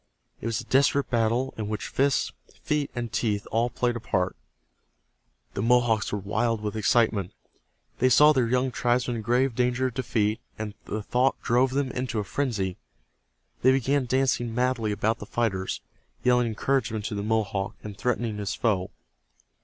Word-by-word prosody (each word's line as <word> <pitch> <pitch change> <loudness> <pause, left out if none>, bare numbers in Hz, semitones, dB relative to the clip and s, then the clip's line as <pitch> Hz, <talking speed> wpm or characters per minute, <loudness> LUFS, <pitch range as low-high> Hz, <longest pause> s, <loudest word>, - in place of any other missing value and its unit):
It - - -4
was 115 -2 -1
a - - -5
desperate 140 +1 +2
battle 120 +3 +1
in 110 -2 -3
which 105 -4 -3
fists, 140 0 +1 0.3
feet 150 -2 0
and 120 -2 -4
teeth 105 -3 0
all 115 +2 +2
played 120 0 -1
a - - -3
part. 90 -4 -1 1.2
The - - -2
Mohawks 115 -2 +3
were 105 - -1
wild 110 +3 0
with 105 0 -4
excitement. 110 -3 +2 0.7
They 130 - +4
saw 150 +5 +7
their 130 -4 +2
young 125 +2 +1
tribesman 120 -1 0
in - - -4
grave 125 +4 +2
danger 125 +2 +1
of 130 - -1
defeat, 110 -4 0 0.2
and 110 -1 -5
the 105 0 -4
thought 125 +5 +1
drove 125 +3 +3
them 135 -2 0
into 125 -2 -3
a 105 - 0
frenzy. 100 -6 -2 0.8
They 130 - +6
began 135 +1 +1
dancing 125 -3 +1
madly 125 -3 +1
about 110 +2 0
the 105 - -8
fighters, 95 - -1 0.4
yelling 125 -1 +3
encouragement 115 -2 -1
to 110 - -3
the 100 - -2
Mohawk, 105 -2 -1
and 105 -2 -7
threatening 115 -1 -1
his 100 -1 -2
foe. 100 -5 0
115 Hz, 170 wpm, -26 LUFS, 105-125 Hz, 1.2 s, saw